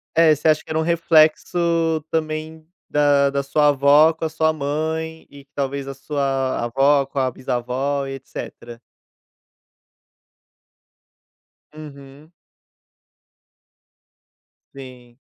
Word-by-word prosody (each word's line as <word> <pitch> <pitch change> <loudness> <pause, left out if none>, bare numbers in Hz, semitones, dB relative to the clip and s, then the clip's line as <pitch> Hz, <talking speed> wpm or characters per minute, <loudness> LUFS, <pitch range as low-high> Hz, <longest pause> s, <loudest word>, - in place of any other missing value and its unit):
é, 160 -1 +5
você 150 +2 -2
acha 155 -1 +2
que - - -21
era 155 - -2
um 160 - +1
reflexo 165 0 +2
também, 155 0 -4 0.2
da 145 -1 +3
da 140 0 -1
sua 150 +2 +2
avó 145 +3 +5
com 160 0 -5
a - - -2
sua 160 0 0
mãe, 160 +2 -4
e 140 -1 -15
talvez 140 0 -3
a 135 - -5
sua 135 -3 -2
avó 135 +4 +2
com 140 - -13
a 130 -1 0
bisavó 130 +3 -3
e 135 - -6
etcetera? 120 -3 -10 2.9
Uhum. 145 0 -13 2.4
Sim. 125 -3 -13
145 Hz, 110 wpm, -21 LUFS, 135-160 Hz, 2.9 s, é